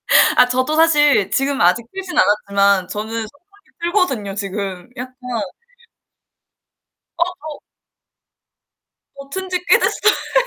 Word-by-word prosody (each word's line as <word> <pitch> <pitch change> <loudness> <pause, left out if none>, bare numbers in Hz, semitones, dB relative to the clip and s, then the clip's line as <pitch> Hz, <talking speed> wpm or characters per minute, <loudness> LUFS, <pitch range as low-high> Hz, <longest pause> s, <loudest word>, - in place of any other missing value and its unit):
아 - - +5
저 - - +6
아 250 - -3
저도 255 +5 0
사실 295 - +3
지금 275 0 0
아직 180 +7 +3
틀진 385 -1 -6
않았지만 200 -2 +2
저는 215 +1 -5
선풍기 355 - -15
틀거든요 270 - -1
지금. 195 -1 -5
약간 255 +1 -6 2.1
어 - - +5 0.2
더 305 -1 -9 1.6
저 275 0 -11
튼지 370 -1 -3
꽤 - - +7
됐어요. - - 0
255 Hz, 225 characters per minute, -18 LUFS, 200-315 Hz, 2.1 s, 꽤